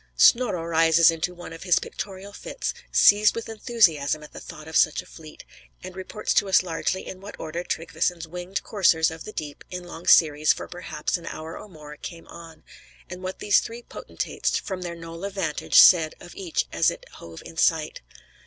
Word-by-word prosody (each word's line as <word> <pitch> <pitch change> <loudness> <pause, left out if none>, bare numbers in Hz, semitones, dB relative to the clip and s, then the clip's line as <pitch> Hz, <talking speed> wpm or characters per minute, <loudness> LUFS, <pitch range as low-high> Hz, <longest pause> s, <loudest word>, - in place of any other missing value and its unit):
Snorro 220 -9 +4
rises 165 0 +5
into 165 +2 -3
one 175 -1 -9
of 165 - -10
his 180 -3 +3
pictorial 195 0 -6
fits, - - -5 0.2
seized 210 +1 +5
with 230 - -5
enthusiasm 180 - +1
at 150 - -13
the - - -8
thought 155 -2 -11
of 160 - -8
such 155 - +3
a - - -21
fleet, 155 -1 -13 0.4
and 185 0 -8
reports 190 +3 -3
to 200 - +2
us 190 - +5
largely 180 +2 -2
in 185 - -9
what 205 +1 -10
order 165 +2 -4
Tryggveson's 170 0 -2
winged 180 +3 -5
Coursers 170 -6 +2
of 160 0 -9
the 215 - -7
Deep, 150 -7 -7
in 180 -1 -6
long 175 -1 -10
series, 155 -2 +5
for - - -8
perhaps 180 +1 -3
an 170 - -12
hour 160 +1 -7
or 210 - -10
more, 150 -4 -12
came 165 +1 -9
on, 165 -2 -12 0.5
and 180 0 -7
what 185 0 -5
the 205 - -8
three 230 +4 +2
potentates, - - -3
from 190 -2 -5
their 175 -1 -5
knoll 165 +1 -9
of 200 0 -4
vantage, 160 -6 -2
said 160 -3 +7
of 175 - -12
each 180 -4 -2
as - - +3
it - - -8
hove 85 -1 -11
in 165 - -11
sight. 160 -1 +1
170 Hz, 200 wpm, -25 LUFS, 160-190 Hz, 0.5 s, said